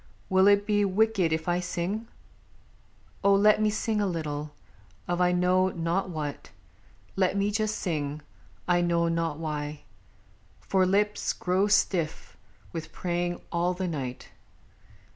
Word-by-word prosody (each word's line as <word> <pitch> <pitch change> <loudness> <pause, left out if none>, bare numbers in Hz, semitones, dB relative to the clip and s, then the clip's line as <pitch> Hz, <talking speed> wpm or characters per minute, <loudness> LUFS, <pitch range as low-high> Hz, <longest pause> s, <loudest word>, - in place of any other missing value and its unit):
Will 190 +1 +5
it 205 0 +5
be 205 -1 +2
wicked 200 -3 +2
if 160 +1 -1
I 175 0 +2
sing? 180 +5 -3 1.2
Oh! 200 0 +5
let 210 +2 +5
Me 215 - +3
sing 215 0 -1
a 205 - +1
little, 150 -4 -3 0.6
of 175 0 0
I 180 0 +4
know 180 +1 +3
not 175 +2 -1
what; 150 -4 -5 0.7
Let 190 0 +1
me 200 +1 +1
just 215 0 0
sing, 150 -4 -3 0.4
I 175 -1 +3
know 170 -1 +2
not 165 -2 -1
why. 150 -2 -4 0.8
For 190 -1 +1
lips 205 +2 +1
Grow 185 +3 +1
stiff 185 -6 0 0.4
with 165 -2 -6
praying 175 0 -2
all 175 +1 0
the 185 0 -2
night. 135 -6 -5
180 Hz, 140 wpm, -27 LUFS, 165-200 Hz, 1.2 s, Will